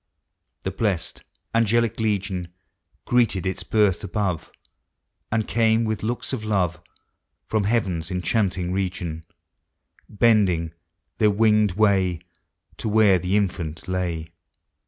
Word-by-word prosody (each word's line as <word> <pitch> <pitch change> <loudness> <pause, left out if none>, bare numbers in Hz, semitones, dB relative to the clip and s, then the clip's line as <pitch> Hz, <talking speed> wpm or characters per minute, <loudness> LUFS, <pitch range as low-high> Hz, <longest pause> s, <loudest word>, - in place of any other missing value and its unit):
The - - -2
blest 95 -7 -2 0.3
nugelic 115 0 +2
legion, 100 -4 -1 0.6
(Ireeted 115 -6 +2
its 95 0 -2
birth 105 -5 +2
above. 100 -4 -2 0.8
And 110 -1 0
came, 115 0 +3
with 110 -1 -2
looks 120 +4 -3
of 120 -5 -3
love. 95 -6 0 0.6
From 110 -2 0
heaven's 95 -7 0
enchanting 90 -1 0
region; 90 -4 -3 0.8
Bending 100 -7 +2 0.5
their 105 - +5
winged 105 -1 +3
way 95 -4 +2 0.6
To 110 - -3
where 105 -3 +5
the 95 +3 +1
infant 85 -4 -2
lay. 85 -3 -2
100 Hz, 110 wpm, -24 LUFS, 90-110 Hz, 0.8 s, their